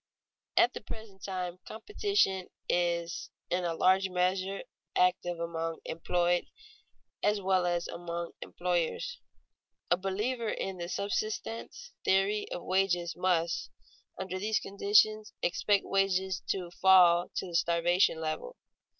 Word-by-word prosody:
_ - - +9
At 245 - +1
the - - -6
present 210 -3 -10
time 180 -2 -4
competition 310 - 0 0.2
is 170 -1 0 0.2
in 180 +1 +1
a 170 -1 -1
large 190 +2 +3
measure 185 +2 0 0.3
active 175 -1 +2
among 165 -1 -3
employed 175 +1 0 0.7
as 210 0 +2
well 185 -2 +2
as 175 -1 0
among 170 0 -5
employers. 180 - -2 0.7
A 175 - +5
believer 210 +5 -2
in 190 -3 -3
the 170 0 -4
subsistence 215 - -3
theory 195 +2 +2
of 175 - -4
wages 180 -2 +1
must, 170 -2 0 0.5
under 185 0 -4
these 215 +2 +1
conditions, 210 +2 +2
expect 195 +3 +2
wages 190 -1 +1
to 180 -3 -2
fall 175 -2 +6
to - - -1
the 175 -2 -6
starvation 170 +1 +3
level. 160 - -4
185 Hz, 125 wpm, -30 LUFS, 175-200 Hz, 0.7 s, _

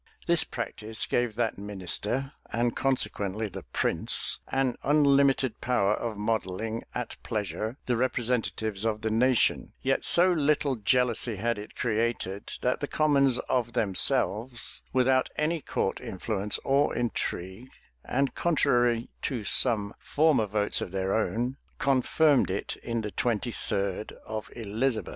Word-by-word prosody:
This 170 -1 +4
practice 110 -2 -3
gave 120 -3 0
that 115 -3 -1
minister, 105 - -2 0.2
and 120 0 0
consequently 110 -5 0
the 95 0 -8
prince, - - +1
an 130 -2 0
unlimited 140 -4 +3
power 105 -5 +2
of 110 -1 -3
modelling 110 +1 -2
at - - -4
pleasure 110 +3 -3
the 125 - +1
representatives 115 -4 -1
of 110 -1 -1
the 110 - -1
nation; 125 +2 +2
yet 135 0 +1
so 180 +1 +6
little 145 -3 +1
jealousy 120 +1 +1
had 115 +2 -1
it 105 - -10
created, 110 -4 -2
that 125 - 0
the 145 - -3
commons 140 -5 +3
of 120 -2 0
themselves, 110 +4 +2
without 130 0 +2
any 155 +1 0
court - - -2
influence 100 +1 -2
or 140 +2 +2
intrigue, 115 -1 -3 0.3
and 135 0 0
contrary 120 -8 +1
to 125 -6 -2
some 105 -2 +3
former 145 -7 +2
votes 105 0 0
of - - -4
their 95 +1 -1
own, 120 +4 -1 0.2
confirmed 140 +1 +3
it 95 +2 -3
in 115 -1 -3
the 105 -1 -5
twenty 120 +2 -1
third 100 -1 -2
of 110 -1 -5
Elizabeth. 115 +2 -1
115 Hz, 135 wpm, -28 LUFS, 105-130 Hz, 0.3 s, so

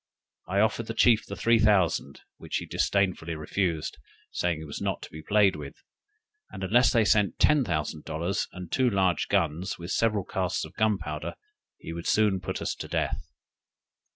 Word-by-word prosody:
I 100 +2 +2
offered 110 +1 +1
the 115 - -4
chief 115 -1 +4
the - - -5
three 115 0 +3
thousand, 95 -10 +2 0.2
which - - -6
he - - -5
disdainfully 95 -4 0
refused, 80 -1 -2 0.3
saying 85 -2 0
he 80 - -8
was 75 - -7
not - - -2
to - - -10
be 80 - -8
played 100 0 +3
with; 75 -2 -8 0.7
and 95 - -8
unless 120 +7 +4
they 115 -4 +3
sent 105 -5 +2
ten 150 -2 +4
thousand 75 -5 -2
dollars, 85 +5 -2
and 90 -2 -9
two 130 -1 +3
large 95 -6 +1
guns, 90 -1 0
with 85 +1 -7
several 105 -3 +1
casks 90 0 -2
of - - -13
gunpowder, 95 -9 -1 0.4
he 80 - -8
would 85 0 -6
soon 105 -3 +3
put - - -4
us - - -1
to - - -6
death. - - -2
95 Hz, 180 wpm, -27 LUFS, 85-105 Hz, 0.7 s, chief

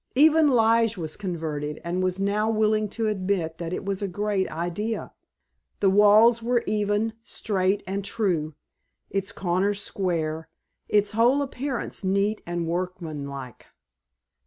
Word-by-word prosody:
Even 310 +3 +6
Lige 230 -3 +3
was 160 -3 -4
converted 155 -6 -4
and 175 +2 -2
was 185 0 0
now 205 +2 +1
willing 215 -1 +2
to 225 +2 -3
admit 185 -5 -1
that 170 -1 -4
it 180 - -4
was 195 0 -2
a 200 - -1
great 200 +1 -1
idea. 175 +7 -3 0.7
The 195 -2 +3
walls 215 +4 +6
were 240 +1 +1
even, 210 +1 0
straight, 195 -3 -1
and 195 +2 -3
true, 175 -8 -1 0.6
its 195 -1 -1
corners 195 +2 0
square, 160 -5 -2 0.4
its 205 -1 +3
whole 240 +6 +3
appearance 265 -5 -4
neat 200 +3 +1
and 175 -1 -2
workman 170 -4 -3
like. 135 -3 -9
200 Hz, 135 wpm, -25 LUFS, 175-215 Hz, 0.7 s, Even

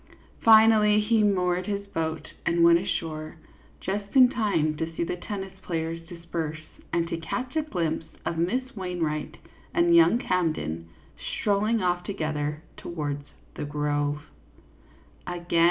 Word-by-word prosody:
Finally, 220 -1 +7
he 215 +1 +3
moored 180 -3 +1
his 200 -1 -2
boat 160 -5 -3 0.2
and 170 0 +2
went 170 0 +7
ashore, 160 -3 -4 0.4
just 200 +3 -4
in 255 -2 +9
time 170 -11 +1
to 160 +2 -3
see - - 0
the 170 - -2
tennis 195 +1 -6
play 165 -2 -2
ers 165 +1 -5
disperse 170 -2 -4 0.3
and 170 -1 +1
to 165 - -3
catch 250 - -4
a 315 - +3
glimpse 170 - -2 0.2
of 170 - -1
Miss 250 +11 -1
Wain 180 -3 -4
wright 155 -1 -2 0.4
and 340 0 +5
young 330 -8 +6
Camden 155 - -1 0.3
strolling 210 +1 0
off 175 0 +1
together 155 -5 -3
towards 145 -4 -4 0.3
the - - -5
grove. 145 0 -1
175 Hz, 140 wpm, -26 LUFS, 155-210 Hz, 0.4 s, in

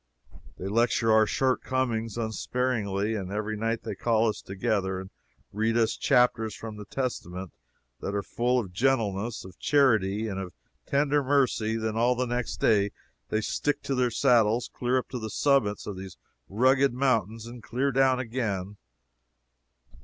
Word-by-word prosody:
They - - -7
lecture 115 +1 +2
our 110 -1 +5
shortcomings 125 -4 0
unsparingly, 110 -2 -1
and 95 -3 -4
every 105 +1 -2
night 115 +2 -2
they - - -4
call 115 -1 +2
us 110 - -2
together 95 0 -1
and 95 0 -9 0.4
read 110 +2 +1
to 115 - +4
us 110 - -1
chapters 115 -3 +2
from 110 -2 -8
the 105 - -8
Testament 95 - -4 0.5
that 100 - -4
are 100 - -1
full 125 +4 0
of 100 -7 -3
gentleness, 115 -3 0
of 95 -2 -13
charity, 110 -7 +2
and 95 -2 -4
of 90 -2 -6 0.3
tender 145 +1 +2
mercy; 130 -5 +2
and 115 - -3
then 110 -1 -1
all 120 +2 +3
the 125 +1 0
next 120 0 -2
day 100 -2 +3 0.4
they 110 - 0
stick 145 +6 -1
to 140 - -2
their 125 -1 +2
saddles 115 0 +3
clear 125 +1 0
up 130 - -2
to 125 - -4
the 110 -1 -5
summits 130 -6 +1
of 100 -3 -5
these 95 -1 -9 0.3
rugged 130 +5 +3
mountains, 115 -4 0
and 120 0 -9
clear 135 +5 -1
down 135 0 +3
again. 110 -6 -3
115 Hz, 165 wpm, -27 LUFS, 105-125 Hz, 0.5 s, our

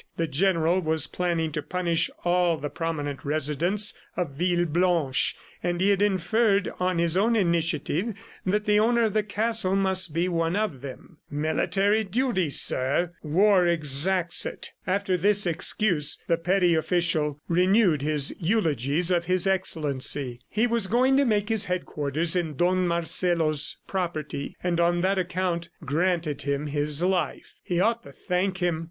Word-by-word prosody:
The 165 - 0
General 165 +2 +1
was 160 -2 +1
planning 170 -3 -2
to 150 - -3
punish 170 0 -1 0.2
all 175 -1 +2
the 145 0 -5
prominent 145 -5 -4
residents 155 +8 0 0.2
of 175 -5 -2
Villeblanche, 175 -2 +1 0.3
and 175 0 -2
he 195 +2 +3
had 200 0 +1
inferred, 205 +1 +1
on 180 -1 0
his 170 0 +1
own 220 +5 +2
initiative, 170 +2 0 0.3
that 210 +3 0
the 210 0 +3
owner 235 +2 +3
of 220 -3 0
the 215 - +2
castle 210 -1 0
must 190 -3 +1
be 170 +4 0
one 165 0 -1
of 205 -12 -2
them. 140 +4 -10
"Military 195 +8 0
duty, 205 - 0
sir.... 140 +5 +1
War 180 +4 +3
exacts 170 +3 +1
it." - - -7 0.2
After 190 -1 0
this 205 +3 +2
excuse 170 -2 0
the 170 - +2
petty 180 +1 +2
official 160 -3 0
renewed 180 -2 +3
his 150 -1 0
eulogies 165 - 0
of 170 -1 +1
His 185 +1 +2
Excellency. 145 -9 0
He 220 +3 +1
was 230 -4 +1
going 255 +5 +3
to 280 - +3
make 210 -3 +1
his 220 -2 +2
headquarters 165 -2 -1
in 165 -4 -1
Don 180 +4 +1
Marcelo's 165 -3 +1
property, 165 -6 -4
and 175 -1 0
on 175 0 +2
that 190 +1 +1
account 180 -1 -2 0.2
granted 160 -1 -1
him 140 +1 -2
his 145 +2 -1
life. 185 -1 -1
He 175 -1 -2
ought 230 +5 +1
to - - -13
thank 185 0 -2
him. 175 -3 -1
175 Hz, 150 wpm, -25 LUFS, 155-195 Hz, 0.3 s, he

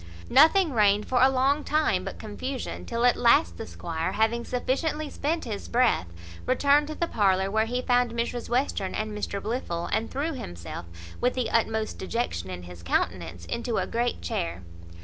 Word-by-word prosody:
Nothing 320 +3 +6
reigned 210 -2 +3
for 250 -1 +2
a 260 - +7
long 270 +3 +2
time 305 -12 +1
but - - -6
confusion; 250 +5 -5
till 235 +1 0
at 245 - +5
last 85 - +4
the - - -6
squire, 160 - -3
having 225 +3 +1
sufficiently 295 +5 -1
spent 320 +3 -2
his 210 -4 -5
breath, 235 - +2 0.4
returned 285 +3 +4
to 310 - -5
the 340 - 0
parlour, 195 - +2
where 220 +1 +2
he 250 +2 -2
found 245 -1 +3
Mrs 235 +1 -3
Western 240 -6 0
and 215 0 -3
Mr 205 -1 -3
Blifil, 195 -7 -3
and 220 +1 0
threw 300 +4 -2
himself, 85 - -7 0.3
with 250 - +2
the 250 -3 -1
utmost 220 -1 0
dejection 190 - -2
in 90 -1 -6
his 90 -1 -11
countenance, 85 0 -2
into 235 - -2
a - - +1
great 240 - -1
chair. 85 +1 -3
230 Hz, 175 wpm, -27 LUFS, 185-255 Hz, 0.4 s, a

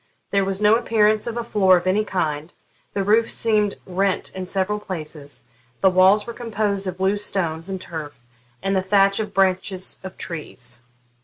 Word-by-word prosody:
There 200 -1 +2
was 195 0 0
no 210 +1 +5
appearance 215 -2 +2
of 235 0 -3
a 235 - -2
floor 190 -5 +4
of 175 - -4
any 195 +3 +2
kind; 160 -5 -2 0.4
the 200 - -1
roof 220 +3 +3
seemed 210 -3 +2
rent 190 +1 0
in 185 -1 -6
several 195 +2 -1
places; 155 - -7 0.4
the 190 - +5
walls 190 +3 +5
were 235 - -6
composed 210 -4 -2
of 185 0 -5
loose 200 +2 +1
stones 165 -3 -2
and 190 -1 -3
turf, 155 -7 -8 0.4
and 195 0 0
the 190 - +2
thatch 195 +1 +3
of 215 -2 -3
branches 190 -1 0
of 190 -1 -8
trees. 125 -7 -5
195 Hz, 175 wpm, -22 LUFS, 185-210 Hz, 0.4 s, no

